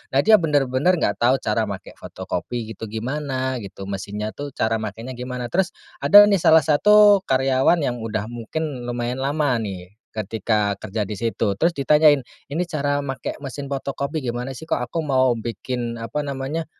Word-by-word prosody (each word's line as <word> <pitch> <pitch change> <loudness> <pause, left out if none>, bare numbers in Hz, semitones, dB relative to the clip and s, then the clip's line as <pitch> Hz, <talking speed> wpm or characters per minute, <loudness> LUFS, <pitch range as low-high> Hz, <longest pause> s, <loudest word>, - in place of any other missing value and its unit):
Nah, 140 - +4
dia 215 -1 +6
bener-bener 145 +1 +2
enggak 170 - -1
tahu 130 +3 +2
cara 110 +1 0
make 100 -2 -7
fotokopi 115 -2 -5
gitu 115 +1 -7
gimana? 130 +3 -3
Gitu, 100 -2 -9
mesinnya, 100 +2 -4
tuh, 145 +1 -8
cara 110 0 0
makainya 110 +4 -6
gimana? 125 -1 -5
Terus, 190 +4 0 0.2
ada, 205 0 +8
nih, 205 -2 +3
salah 160 -1 +5
satu 205 +7 +6
karyawan 135 +5 +2
yang 120 -3 -1
udah 110 0 -4
mungkin 125 +2 -5
lumayan 120 +1 -3
lama, 140 -2 0
nih, 95 -4 -6 0.2
ketika 105 0 -1
kerja 105 +1 -3
di 105 - -5
situ. 110 0 -1
Terus, 160 - +2
ditanyain, 145 -1 +4 0.2
"Ini 160 +5 -1
cara 145 -4 -1
make 135 -3 -4
mesin 140 +1 -6
fotokopi 140 +1 -3
gimana, 120 +2 -3
sih? 160 - -9
Kok, 160 - -1
aku 165 - -2
mau 130 -4 +2
bikin, 115 +1 -4
apa 145 +6 -3
namanya, 140 +4 -3
130 Hz, 170 wpm, -22 LUFS, 115-145 Hz, 0.2 s, ada